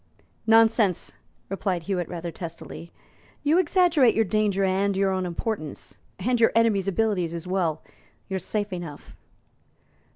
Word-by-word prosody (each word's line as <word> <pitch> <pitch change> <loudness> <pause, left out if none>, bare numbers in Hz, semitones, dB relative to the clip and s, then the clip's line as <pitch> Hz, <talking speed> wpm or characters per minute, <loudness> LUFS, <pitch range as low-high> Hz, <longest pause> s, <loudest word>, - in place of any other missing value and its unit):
"Nonsense!" 225 -4 +4 0.3
replied 190 -3 -2
Hewitt 180 -2 -2
rather 170 -1 -5
testily; 165 0 -8 0.5
"you 305 +4 +4
exaggerate 340 - +4
your 225 - +3
danger 205 -1 +1
and 195 +1 +1
your 195 0 +2
own 185 -1 -1
importance, 175 -3 -5 0.2
and 240 +5 0
your 225 - +5
enemies' 220 -4 +3
abilities 195 -4 0
as 170 - -6
well. 180 -4 -1 0.4
You're 190 -1 -2
safe 205 +2 -2
enough." 170 -5 -8
195 Hz, 130 wpm, -25 LUFS, 175-225 Hz, 0.5 s, your